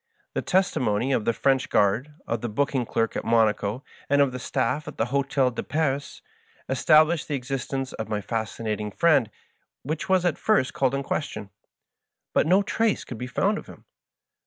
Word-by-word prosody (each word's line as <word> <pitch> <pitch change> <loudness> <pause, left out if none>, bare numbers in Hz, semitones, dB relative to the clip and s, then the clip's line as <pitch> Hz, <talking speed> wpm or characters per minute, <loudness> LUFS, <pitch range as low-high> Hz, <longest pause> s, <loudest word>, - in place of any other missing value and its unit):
The - - -1
testimony 130 - +1
of 115 -5 +1
the - - +3
French 135 +2 +1
guard, 115 +9 +1
of 115 -1 -2
the 120 - -3
booking 130 +1 0
clerk 115 -1 0
at - - -2
Monaco, 110 +1 +1 0.3
and 145 0 +3
of 140 -2 +4
the 125 - -5
stafi 130 +4 -1
of - - -8
the 110 - +1
Hdtel 135 0 +1
de - - -3
Paris, 145 -2 -2 0.4
established 155 +4 +4
'the 145 - -1
exist 135 0 -4
ence 135 -1 -3
of 110 - -5
my 105 -1 -1
Fascinating 110 -1 -3
Friend, 140 - +3 0.5
which 155 +6 -4
was 185 -1 +3
at 175 - 0
first 210 -12 +2
called 135 0 +1
in 140 - -2
question; 105 -8 -4 0.8
but - - +3
no 190 +4 +4
trace 225 +1 0
could 120 - -8
be 125 - -4
found - - 0
of - - -13
him. - - -14
130 Hz, 185 wpm, -25 LUFS, 115-145 Hz, 0.8 s, of